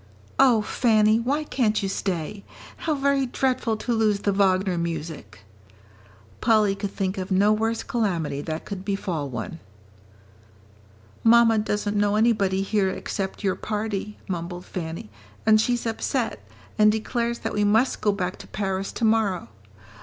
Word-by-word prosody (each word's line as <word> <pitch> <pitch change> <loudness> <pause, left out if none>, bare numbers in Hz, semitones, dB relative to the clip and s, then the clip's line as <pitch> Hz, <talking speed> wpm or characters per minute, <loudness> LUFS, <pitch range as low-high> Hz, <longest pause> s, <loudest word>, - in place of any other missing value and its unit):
"Oh, 245 -5 +5
Fanny, 215 -2 +3
why 280 +6 0
can't 220 -8 0
you - - 0
stay? 190 0 -3 0.3
How 315 -2 -1
very 275 -1 +1
dreadful 250 -3 0
to 240 +2 -2
lose 215 -3 +2
the 205 - +1
Wagner 190 -1 +2
music!" 160 - -5 1.0
Polly 215 -3 +4
could 200 0 -4
think 190 0 -2
of 185 - -4
no 200 +2 +4
worse 225 +1 -1
calamity 180 - -1
that 160 +1 -5
could 195 -2 -6
befall 180 -7 -2
one. 125 +7 -5 1.6
"Mamma 230 -1 +6
doesn't 210 -1 -1
know 205 0 +2
anybody 205 -4 +2
here 195 -1 +1
except 195 +1 -4
your 190 -2 +2
party," 210 0 -3
mumbled 175 0 -5
Fanny, 160 - -6 0.3
"and 215 0 +6
she's 240 +1 0
upset, 225 -1 -2 0.4
and 210 0 +7
declares 235 +2 -1
that - - -4
we 210 - +1
must 220 +5 +2
go 210 - +3
back 185 -2 -3
to - - -11
Paris 195 -1 -2
to 235 - -1
morrow. 215 - +1
205 Hz, 145 wpm, -24 LUFS, 190-225 Hz, 1.6 s, and